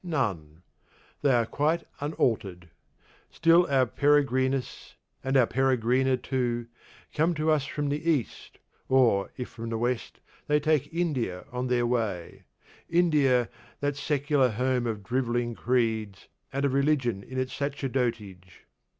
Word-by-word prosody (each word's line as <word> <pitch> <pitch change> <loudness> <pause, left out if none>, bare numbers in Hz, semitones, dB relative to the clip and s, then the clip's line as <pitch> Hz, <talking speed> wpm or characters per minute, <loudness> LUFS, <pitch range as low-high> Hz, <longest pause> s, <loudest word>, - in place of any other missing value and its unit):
None; 95 - -3 0.6
they 145 - +3
are 120 -2 +3
quite 155 +7 0 0.2
unaltered. 100 - -2 0.6
Still 170 +1 +4
our 135 -2 +3
Perigrinus, 135 -1 0 0.3
and 135 +1 +1
our 125 - +6
Perigrina 130 +1 +2
too, 120 -2 -2 0.5
come 165 +3 +1
to 155 +1 +1
us 150 -3 +2
from 145 -1 -2
the 150 +4 -1
East, 140 -9 -2 0.3
or, 120 -7 +3
if 125 - -5
from 115 0 -7
the 115 - -2
West, 120 +1 -2 0.3
they 150 0 +3
take 155 -2 +1
India 140 - -2
on 125 +1 -3
their 125 -1 +1
way 110 -8 -2 0.5
India, 150 -8 +3 0.3
that 145 0 -1
secular 145 -2 +1
home 125 +2 0
of 110 -3 -4
drivelling 120 +1 -1
creeds, 110 -5 -1 0.2
and 140 +1 -1
of 135 - 0
religion 135 -7 +1
in 130 +6 -9
its 130 0 -2
sacerdotage. 120 - -3
130 Hz, 135 wpm, -27 LUFS, 115-145 Hz, 0.6 s, our